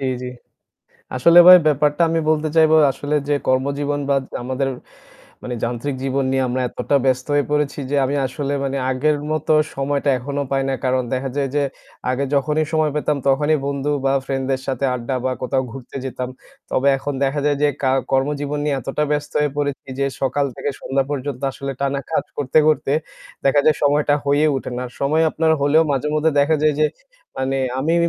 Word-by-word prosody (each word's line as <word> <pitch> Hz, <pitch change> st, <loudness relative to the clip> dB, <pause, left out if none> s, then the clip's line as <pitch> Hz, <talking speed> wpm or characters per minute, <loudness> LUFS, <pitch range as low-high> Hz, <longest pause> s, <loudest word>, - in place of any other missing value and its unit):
জি, -, -, -4 dB, 0.2 s
জি। -, -, -4 dB, 0.9 s
আসলে 170 Hz, +7 st, +6 dB
ভাই 180 Hz, -, +12 dB
ব্যাপারটা 150 Hz, +2 st, +2 dB
আমি 165 Hz, 0 st, +1 dB
বলতে 155 Hz, 0 st, +1 dB
চাইবো, 160 Hz, 0 st, +5 dB, 0.2 s
আসলে 145 Hz, +3 st, -3 dB
যে 145 Hz, -, +2 dB
কর্মজীবন 140 Hz, +2 st, 0 dB
বা 140 Hz, -, +3 dB
জ -, -, -11 dB, 0.2 s
আমাদের 130 Hz, +2 st, -2 dB, 0.7 s
মানে 125 Hz, -, -4 dB
যান্ত্রিক 120 Hz, +4 st, -2 dB
জীবন 135 Hz, 0 st, 0 dB
নিয়ে 135 Hz, 0 st, +1 dB
আমরা 130 Hz, +1 st, -1 dB
এতটা 145 Hz, -, -1 dB
ব্যস্ত 130 Hz, -1 st, +1 dB
হয়ে 145 Hz, -, +3 dB
পড়েছি 150 Hz, -1 st, 0 dB
যে, -, -, -1 dB
আমি 135 Hz, -, -1 dB
আসলে 140 Hz, +2 st, -4 dB
মানে 135 Hz, 0 st, -2 dB
আগের 150 Hz, +4 st, +1 dB, 0.2 s
মতো 155 Hz, 0 st, 0 dB, 0.2 s
সময়টা 140 Hz, +1 st, 0 dB
এখনো 140 Hz, +3 st, -3 dB
পাই 135 Hz, 0 st, +1 dB
না। 135 Hz, -, 0 dB
কারণ 130 Hz, 0 st, +1 dB
দেখা 135 Hz, +1 st, -2 dB
যায় 140 Hz, -1 st, 0 dB
যে, 145 Hz, -, +2 dB, 0.5 s
আগে 130 Hz, +2 st, 0 dB
যখনই 150 Hz, +3 st, +1 dB
সময় 155 Hz, -1 st, +2 dB
পেতাম 150 Hz, 0 st, 0 dB
তখনই 145 Hz, +3 st, +3 dB
বন্ধু 140 Hz, +1 st, -2 dB
বা 135 Hz, -, +2 dB
ফ্রেন্ডদের 135 Hz, -1 st, -2 dB
সাথে 135 Hz, +1 st, -2 dB
আড্ডা 125 Hz, +1 st, -3 dB
বা 130 Hz, -, +1 dB
কোথাও 130 Hz, +1 st, 0 dB
ঘুরতে 130 Hz, 0 st, -9 dB
যেতাম। 130 Hz, -1 st, -4 dB, 0.4 s
তবে 135 Hz, +2 st, +2 dB
এখন 145 Hz, +2 st, -4 dB
দেখা 140 Hz, +2 st, 0 dB
যায় 145 Hz, -1 st, +2 dB
যে, 145 Hz, -, +5 dB
কা 130 Hz, -, +2 dB, 0.2 s
কর্মজীবন 145 Hz, +2 st, 0 dB
নিয়ে 150 Hz, -1 st, +1 dB
এতটা 135 Hz, +4 st, -2 dB
ব্যস্ত 150 Hz, 0 st, -2 dB
হয়ে 150 Hz, -, +1 dB
পড়েছি 145 Hz, -2 st, -3 dB
যে, 140 Hz, -, +1 dB, 0.2 s
সকাল 135 Hz, +2 st, 0 dB
থেকে 145 Hz, -, -2 dB
সন্ধ্যা 135 Hz, 0 st, 0 dB
পর্যন্ত 140 Hz, -2 st, -4 dB
আসলে 140 Hz, +1 st, -5 dB
টানা 140 Hz, 0 st, 0 dB
কাজ 160 Hz, -, 0 dB
করতে, 145 Hz, +1 st, +1 dB
করতে 150 Hz, -3 st, +1 dB, 0.5 s
দেখা 140 Hz, +1 st, +4 dB
যায় 155 Hz, -, +4 dB
সময়টা 145 Hz, 0 st, +3 dB
হয়ে 145 Hz, +2 st, +3 dB
উঠে 130 Hz, -, -5 dB
না। 125 Hz, -, -3 dB, 0.2 s
সময় 155 Hz, +4 st, +2 dB
আপনার 160 Hz, 0 st, +1 dB
হলেও 145 Hz, +3 st, +4 dB
মাঝেমধ্যে 150 Hz, +3 st, +1 dB
দেখা 155 Hz, +2 st, +3 dB
যায় 155 Hz, -1 st, +3 dB
যে, 155 Hz, -, +5 dB, 0.5 s
মানে 135 Hz, +1 st, -1 dB, 0.2 s
আমি 155 Hz, +5 st, +1 dB
140 Hz, 190 wpm, -20 LUFS, 135-150 Hz, 0.9 s, ভাই